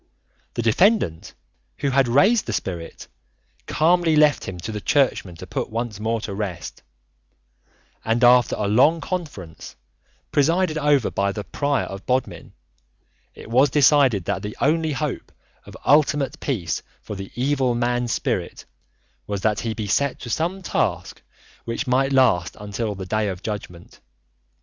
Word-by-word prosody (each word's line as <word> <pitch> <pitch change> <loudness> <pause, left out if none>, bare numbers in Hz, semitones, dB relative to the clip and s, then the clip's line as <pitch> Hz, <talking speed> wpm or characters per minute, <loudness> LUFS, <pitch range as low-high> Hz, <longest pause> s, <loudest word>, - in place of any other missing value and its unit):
The 120 - -1
defendant, 115 - +2 0.4
who 140 -1 -1
had 135 -1 +3
raised 195 - +3
the - - -2
spirit, 85 -3 -5 0.6
calmly 165 0 +3
left 150 -1 +4
him 95 - -6
to 110 - -5
the 105 -1 -5
Churchmen 125 -11 +1
to - - -9
put - - -4
once 115 -2 -4
more 115 +1 -1
to 105 - -5
rest, 95 -5 -5 1.2
and 115 +2 0
after 125 -1 +5
a 105 - -2
long 135 +11 +4
conference, 145 - -6 0.6
presided 165 +3 +2
over 145 -5 +2
by 100 0 0
the 105 +1 -5
Prior 140 +2 -1
of 95 0 -9
Bodmin, 130 +1 -2 0.8
it - - -11
was 130 +4 +4
decided 135 - +4
that 95 - -2
the 105 0 -7
only 160 +1 +1
hope 145 0 -4 0.4
of - - -11
ultimate 145 -2 +2
peace 95 - -2 0.2
for 105 - -6
the 95 0 -8
evil 130 -1 +1
man's 120 0 0
spirit - - -2 0.6
was 100 -1 -3
that 105 0 +1
he 115 -1 -3
be 110 - -4
set 140 +7 0
to 120 - -6
some 175 - -2
task - - -2 0.4
which 115 +5 -3
might 135 +1 +1
last 120 -11 +2
until 105 +1 -4
the 95 -1 -6
Day 110 +3 0
of 95 -1 -5
Judgment. 95 -5 -7
120 Hz, 150 wpm, -22 LUFS, 105-145 Hz, 1.2 s, after